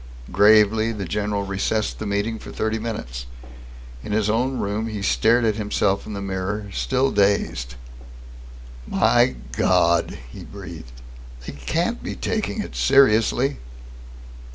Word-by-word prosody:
Gravely 110 +3 +5
the 105 -3 -5
general 105 +2 -2
recessed 100 +2 -2
the 110 - -4
meeting 105 +3 -1
for - - -10
thirty 110 +1 -2
minutes. 60 - -5 0.8
In 105 - -4
his 105 -1 +1
own 125 +4 0
room, 105 +2 -2
he 105 -3 -5
stared 115 +3 +3
at 110 -1 +1
himself 105 -2 0
in 105 - -6
the 100 -1 -5
mirror, 100 +2 -4
still 130 +1 0
dazed. 80 -12 0 1.1
"My - - +3 0.2
God!" 85 +5 +2
he - - -10
breathed. 60 - -10 0.5
"They - - -6
can't 170 - -2
be - - -5
taking 215 0 -2
it - - -10
seriously!" 135 +1 +3
105 Hz, 130 wpm, -22 LUFS, 100-115 Hz, 1.1 s, Gravely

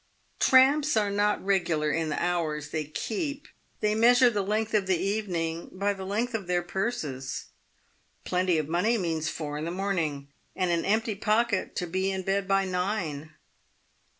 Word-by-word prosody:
Tramps 280 +1 +5
are 205 -2 +2
not 205 0 +1
regular 170 -6 +1
in 160 +1 -1
the 150 - -2
hours 160 -4 -1
they 155 -1 -2
keep. 275 - -4 0.3
They 210 0 +2
measure 245 +3 +5
the 205 -2 0
length 215 +3 -1
of 205 -3 +2
the 185 -2 +2
evening 175 -5 -2
by 200 +2 0
the 190 -1 -7
length 230 +5 -1
of 205 -5 -3
their 175 -1 +1
purses. 165 - -3 0.8
Plenty 180 -1 +1
of 155 -2 -1
money 180 +9 +1
means 165 -5 -1
four 150 -2 -4
in 155 - -3
the - - -2
morning, 170 -7 -2 0.3
and 185 -2 0
an 170 -1 0
empty 220 +2 +1
pocket, 215 0 0
to 180 - -1
be 185 +3 -1
in 190 -1 -2
bed 195 +1 0
by 195 0 +2
nine. 180 -5 -3
190 Hz, 170 wpm, -27 LUFS, 165-215 Hz, 0.8 s, Tramps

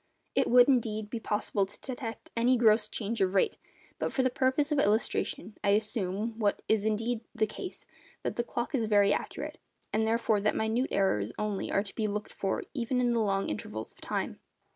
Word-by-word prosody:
It - - +2
would, 245 0 +7
indeed, 220 -5 +1
be 235 - -2
possible 205 -2 0
to 200 - -13
detect 245 -3 -6
any 245 +2 +4
gross 215 -2 +4
change 220 +1 -3
of 190 0 +2
rate; 190 - +2 0.4
but - - -1
for 265 - +1
the 255 - +2
purpose 265 +4 +1
of 295 - +2
illustration 215 -1 0
I 200 - +4
assume, 215 +1 -2
what 205 -2 +1
is 215 -1 +2
indeed 225 +2 0
the 220 - +3
case, 365 - -8 0.4
that - - -2
the 240 - 0
clock 240 +5 -3
is 240 -5 +1
very 205 -1 +4
accurate, - - -4 0.3
and 220 +1 +2
therefore 225 -2 +2
that 210 - +1
minute 225 +4 +1
errors 120 - +1
only 210 -2 -2
are 200 - +2
to 200 - -8
be 220 -2 -1
looked 210 0 -4
for 195 -1 -1
even 250 -2 0
in 245 -1 +2
long 200 -4 +1
intervals 110 +1 -5
of - - -19
time. - - -3
220 Hz, 195 wpm, -30 LUFS, 205-240 Hz, 0.4 s, would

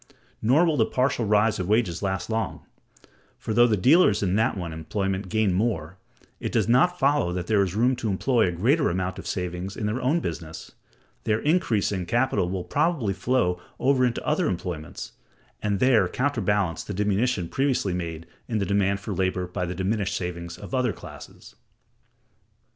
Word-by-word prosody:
Nor 135 +10 +4
will 160 -3 +1
the - - +4
partial 125 -2 0
rise 105 0 +2
of 90 - -2
wages 105 -6 +1
last 95 -2 -2
long: 110 -2 -3 0.7
for, 110 - -4
though 120 +2 +6
the 110 -3 +1
dealers 130 - +4
in 95 -2 +1
that 110 +1 +1
one 85 -3 -4
employment 95 +4 -3
gain 110 -3 +1
more, 90 -4 -1 0.4
it - - -4
does - - +1
not 135 +10 +3
follow 140 - +2
that 90 -1 -3
there 105 +1 +2
is 95 -1 -1
room 125 +4 +3
to 110 - -2
employ 110 +3 +2
a - - 0
greater 130 - +2
amount 95 +1 -2
of - - -8
savings 90 +1 -4
in 105 - -3
their 110 +5 -1
own 145 +7 +2
business: 80 - -6 0.5
their 110 -1 +1
increasing 110 - +1
capital 120 -6 +1
will 95 -1 -3
probably 140 - 0
flow 95 -3 0 0.2
over 130 0 +2
into 120 -2 0
other 155 +2 +1
employments, 85 -4 -5 0.5
and 100 -2 0
there 120 -6 +4
counterbalance 105 - 0
the 105 - -6
diminution 105 0 0
previously 130 -5 0
made 85 -2 -4 0.2
in 115 - -1
the 100 - 0
demand 100 0 +1
for 100 +1 -5
labor 90 0 -1
by 90 0 -4
the 90 - -4
diminished 100 +1 -1
savings 85 -1 -5
of - - -10
other 125 -4 +1
classes. - - -12
100 Hz, 175 wpm, -25 LUFS, 90-125 Hz, 0.7 s, though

